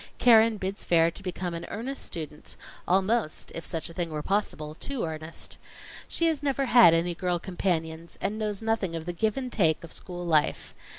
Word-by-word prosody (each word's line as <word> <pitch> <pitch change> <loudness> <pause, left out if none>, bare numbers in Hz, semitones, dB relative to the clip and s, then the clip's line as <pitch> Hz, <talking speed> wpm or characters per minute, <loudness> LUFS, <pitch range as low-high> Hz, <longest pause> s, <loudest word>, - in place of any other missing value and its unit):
Keren 225 -2 +6
bids 195 +1 -3
fair 165 -1 +4
to 180 - -11
become 180 -2 -4
an 170 0 -5
earnest 255 +6 -3
student 155 -2 -6 0.3
almost, 195 -1 +1
if 165 - -5
such 165 -2 -2
a 165 - -9
thing 170 -1 -2
were 150 -1 -4
possible, 175 -7 -1
too 260 - -3
earnest. 160 0 -6 0.5
She 335 - +1
has 320 -3 +2
never 275 -1 0
had 235 -9 +7
any 170 +1 +1
girl 180 0 -1
companions, 170 -2 -3
and 215 +2 -2
knows 210 -1 -2
nothing 220 -6 0
of 160 -1 -5
the 175 - -3
give 215 +6 0
and 255 -2 -3
take 160 -7 +2
of 170 - -10
school 175 -2 -7
life. 155 -3 +1
180 Hz, 190 wpm, -27 LUFS, 165-220 Hz, 0.5 s, had